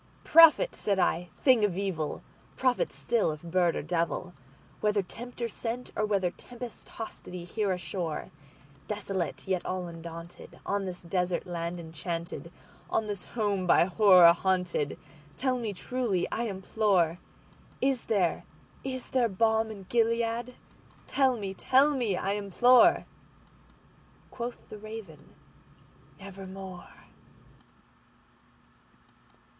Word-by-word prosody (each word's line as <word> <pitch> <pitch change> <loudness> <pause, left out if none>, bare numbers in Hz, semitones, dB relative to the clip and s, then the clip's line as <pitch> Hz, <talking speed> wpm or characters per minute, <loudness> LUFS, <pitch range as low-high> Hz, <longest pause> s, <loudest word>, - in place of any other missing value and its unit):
"Prophet!" 330 +10 +7
said 200 -2 0
I, 180 -1 +1
"thing 255 -5 +5
of 190 -4 +1
evil! 180 -7 -2 0.3
prophet 255 -1 +1
still, 230 -8 0
if 150 - -11
bird 170 0 +2
or - - -3
devil! 175 +2 -2 0.5
Whether 210 -1 +1
Tempter 240 +5 -6
sent, 230 +2 -5
or 215 - 0
whether 195 -4 +1
tempest 245 +4 -10
tossed 225 - -8
thee 180 -1 -7
here 200 +3 -1
ashore, 175 -3 -4 0.6
Desolate 195 -5 -3
yet 185 -2 0
all 185 -1 -3
undaunted, 170 0 -9
on 200 0 -1
this 180 -1 -6
desert 180 0 -1
land 175 -1 -4
enchanted—On 170 +6 -5
this 205 -3 -5
home 205 -5 -1
by 170 - +6
Horror 180 -3 +7
haunted—tell 180 - -2
me 225 -3 -2
truly, 215 -2 -1
I 235 - -1
implore:Is 200 +5 -1
there—is 230 +6 -3
there 245 -3 +2
balm 220 +2 +2
in 205 -3 -8
Gilead?—tell 235 +3 -1
me—tell 255 +8 +2
me, 225 -8 0
I 195 - -1
implore!"Quoth 245 - 0
the 210 - -9
Raven, 215 -8 -10 0.8
"Nevermore." 190 -1 -9
195 Hz, 105 wpm, -29 LUFS, 175-230 Hz, 0.8 s, Prophet